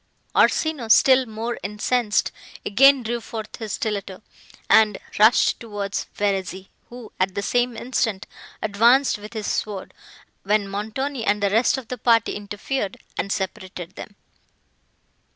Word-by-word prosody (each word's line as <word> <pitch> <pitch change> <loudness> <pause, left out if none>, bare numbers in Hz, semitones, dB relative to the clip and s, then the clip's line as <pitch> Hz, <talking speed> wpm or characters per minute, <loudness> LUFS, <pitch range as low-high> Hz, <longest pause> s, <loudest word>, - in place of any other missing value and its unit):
Orsino, 310 -7 +2
still 260 +3 +5
more 225 +2 -4
incensed, 210 +3 0 0.3
again 275 +4 +5
drew 235 +1 -3
forth 220 -1 -7
his 220 -3 -5
stilletto, 205 -2 -4 0.4
and 215 -2 +5 0.2
rushed 215 +3 +5
towards 205 -3 -4
Verezzi, 195 -2 -2 0.2
who, 240 -2 -11
at 185 0 0
the 200 - -2
same 245 +1 0
instant, 225 -6 -1 0.4
advanced 235 +4 +3
with 210 +2 -10
his 215 -2 -4
sword, 205 -3 -3 0.5
when 205 0 +1
Montoni 225 +6 -3
and 205 -1 +1
the 200 - +2
rest 230 +5 +3
of 260 -4 -8
the 250 - -5
party 230 0 +3
interfered 205 +2 -4 0.2
and 200 - -3
separated 190 -2 -5
them. 205 - -10
215 Hz, 135 wpm, -23 LUFS, 200-240 Hz, 0.5 s, still